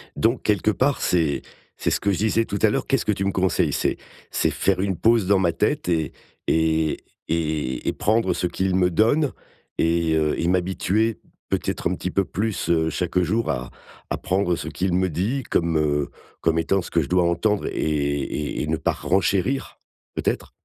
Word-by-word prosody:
Donc, 115 Hz, +2 st, +1 dB
quelque 105 Hz, 0 st, +2 dB
part 130 Hz, +5 st, +1 dB
c'est 80 Hz, -5 st, +1 dB, 0.4 s
c'est -, -, 0 dB
ce -, -, +1 dB
que 100 Hz, -, +1 dB
je 95 Hz, -, 0 dB
disais 110 Hz, +1 st, +2 dB
tout 100 Hz, -, -3 dB
à 110 Hz, -, +5 dB
l'heure, -, -, -1 dB
qu'est-ce 135 Hz, -3 st, +1 dB
que 105 Hz, -, +2 dB
tu 95 Hz, -1 st, -1 dB
me 100 Hz, -, +1 dB
conseilles? 95 Hz, -3 st, +1 dB
C'est -, -, 0 dB, 0.3 s
c'est -, -, +1 dB
faire 95 Hz, -1 st, +1 dB
une 95 Hz, -2 st, 0 dB
pause 115 Hz, -4 st, +3 dB
dans 100 Hz, -1 st, +4 dB
ma 90 Hz, -3 st, +2 dB
tête 105 Hz, -, 0 dB
et 80 Hz, -4 st, 0 dB, 0.4 s
et 80 Hz, -1 st, +2 dB, 0.3 s
et 75 Hz, -6 st, -1 dB
et -, -, +1 dB
prendre 110 Hz, +3 st, +1 dB
ce 90 Hz, -, -1 dB
qu'il 95 Hz, +2 st, -1 dB
me 90 Hz, -1 st, +3 dB
donne 115 Hz, -, +2 dB, 0.5 s
et 85 Hz, 0 st, +2 dB
heu 75 Hz, -1 st, +1 dB
et 85 Hz, -, 0 dB
m'habituer 95 Hz, +5 st, +1 dB, 0.3 s
peut-être -, -, -1 dB
un 90 Hz, -, -1 dB
petit 90 Hz, -, -4 dB
peu 100 Hz, -, +1 dB
plus, 105 Hz, 0 st, -2 dB
heu, 80 Hz, -1 st, +3 dB
chaque 90 Hz, +3 st, -1 dB
jour 95 Hz, +1 st, +1 dB
à 65 Hz, -3 st, -4 dB, 0.4 s
à -, -, -1 dB
prendre 95 Hz, -1 st, 0 dB
ce 80 Hz, -, -6 dB
qu'il 90 Hz, +3 st, -1 dB
me 95 Hz, 0 st, +2 dB
dit 105 Hz, -, -1 dB
comme, 85 Hz, -5 st, +1 dB
heu, 75 Hz, -2 st, +1 dB, 0.3 s
comme 80 Hz, 0 st, +2 dB
étant 95 Hz, +4 st, +1 dB
ce -, -, -8 dB
que 85 Hz, -, +3 dB
je 70 Hz, -, -4 dB
dois 90 Hz, -1 st, +3 dB
entendre 100 Hz, +4 st, 0 dB
et -, -, -3 dB
et 70 Hz, -1 st, -1 dB
et -, -, -3 dB
ne 80 Hz, +1 st, 0 dB
pas -, -, 0 dB
renchérir 100 Hz, +8 st, 0 dB, 0.4 s
peut-être? -, -, -2 dB
90 Hz, 200 wpm, -23 LUFS, 80-105 Hz, 0.5 s, à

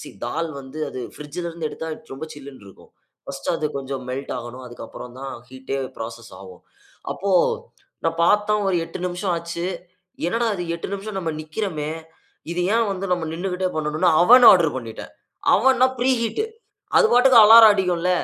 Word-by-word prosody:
சீ -, -, -9 dB, 0.2 s
தால் 165 Hz, 0 st, -2 dB
வந்து 135 Hz, +3 st, -10 dB
அது 130 Hz, -, -6 dB, 0.2 s
பிரிட்ஜ்‌ல 150 Hz, +4 st, -6 dB
இருந்து 165 Hz, -2 st, -4 dB
எடுத்தா 160 Hz, -, -6 dB, 0.2 s
ரொம்ப 140 Hz, +4 st, -6 dB
சில்லுனு 140 Hz, -6 st, -12 dB
இருக்கும். 95 Hz, -, -17 dB, 0.4 s
1 135 Hz, 0 st, -7 dB
அது 155 Hz, -, -1 dB
கொஞ்சம் 135 Hz, -1 st, -5 dB
மெல்ட் 135 Hz, +2 st, -5 dB
ஆகணும், 120 Hz, +2 st, -9 dB
அதுக்கப்புறம் 120 Hz, 0 st, -10 dB
தான் 135 Hz, 0 st, -6 dB, 0.2 s
ஹீட்‌டே 130 Hz, +1 st, -5 dB, 0.2 s
ஃப்ராசஸ் 115 Hz, 0 st, -8 dB
ஆகும். 95 Hz, -2 st, -13 dB, 0.5 s
அப்போ 200 Hz, +1 st, -3 dB, 0.8 s
நான் 165 Hz, 0 st, 0 dB
பாத்தேன், 210 Hz, +2 st, +2 dB
ஒரு 190 Hz, -, +1 dB
8 165 Hz, -, -8 dB
நிமிஷம் 180 Hz, +1 st, -2 dB
ஆச்சு. 170 Hz, +1 st, -4 dB, 0.6 s
என்னடா 230 Hz, +6 st, 0 dB
அது 175 Hz, -, -4 dB
8 170 Hz, -, -6 dB
நிமிஷம் 200 Hz, 0 st, -5 dB
நம்ம 165 Hz, -3 st, -3 dB
நிக்கிறோமே? 155 Hz, -1 st, -4 dB, 0.6 s
இது 170 Hz, -, -3 dB, 0.2 s
ஏன் 230 Hz, -2 st, +2 dB
வந்து 195 Hz, 0 st, -4 dB
நம்ம 175 Hz, -2 st, 0 dB
நின்னுக்கிட்டே 185 Hz, +2 st, -2 dB
பண்ணனும்னு, 155 Hz, +3 st, +1 dB
அவன் 245 Hz, +7 st, +8 dB
ஆர்டர் 165 Hz, -6 st, +3 dB
பண்ணிட்டேன். 115 Hz, -3 st, -8 dB, 0.4 s
அவன்னா 260 Hz, 0 st, +4 dB
பிரீ 260 Hz, +2 st, +3 dB
ஹீட். 235 Hz, -, -1 dB, 0.5 s
அது 450 Hz, -, +6 dB
பாட்டுக்கு 250 Hz, 0 st, +6 dB
அலாரம் 220 Hz, 0 st, +9 dB
அடிக்கும்ல. 180 Hz, -3 st, 0 dB
170 Hz, 160 wpm, -22 LUFS, 135-200 Hz, 0.8 s, அலாரம்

